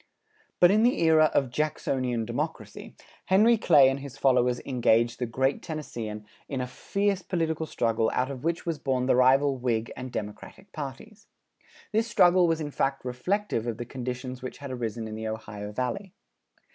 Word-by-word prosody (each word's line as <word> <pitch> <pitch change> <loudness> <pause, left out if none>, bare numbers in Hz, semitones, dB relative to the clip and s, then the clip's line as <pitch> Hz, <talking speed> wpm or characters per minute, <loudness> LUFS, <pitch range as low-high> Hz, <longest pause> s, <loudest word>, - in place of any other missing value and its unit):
But 175 0 +7
in 215 +2 +4
the 245 +2 +3
era 160 -1 +5
of 135 -3 +1
Jacksonian 130 -5 -1
democracy, 120 +2 -5 0.3
Henry 215 +5 +5
Clay 145 -10 +6
and 135 +1 0
his 140 -2 -9
followers 125 -2 +3
engaged 120 -2 +2
the 125 - -1
great 130 +4 0
Tennesseean 115 -10 -6 0.2
in 135 - -3
a 125 - -1
fierce 200 +9 -1
political 160 -3 -2
struggle 115 -4 0
out 130 +2 0
of 130 -1 -8
which 170 +1 -1
was 165 -3 -2
born 130 -2 0
the 130 - +3
rival 135 +2 +4
Whig 120 -2 -1
and 130 0 -7
Democratic 110 - -7
parties. 165 +10 -8 0.6
This 220 +2 +1
struggle 180 -4 +5
was 165 -1 +1
in 150 -2 -4
fact 135 -1 -1
reflective 125 - -1
of 115 -2 -3
the 120 - -5
conditions 125 0 -5
which 130 - -7
had 140 -2 -7
arisen 115 -2 -4
in 110 - -7
the 110 0 -5
Ohio 105 -2 -6
Valley. 175 - -4
130 Hz, 170 wpm, -27 LUFS, 120-160 Hz, 0.6 s, But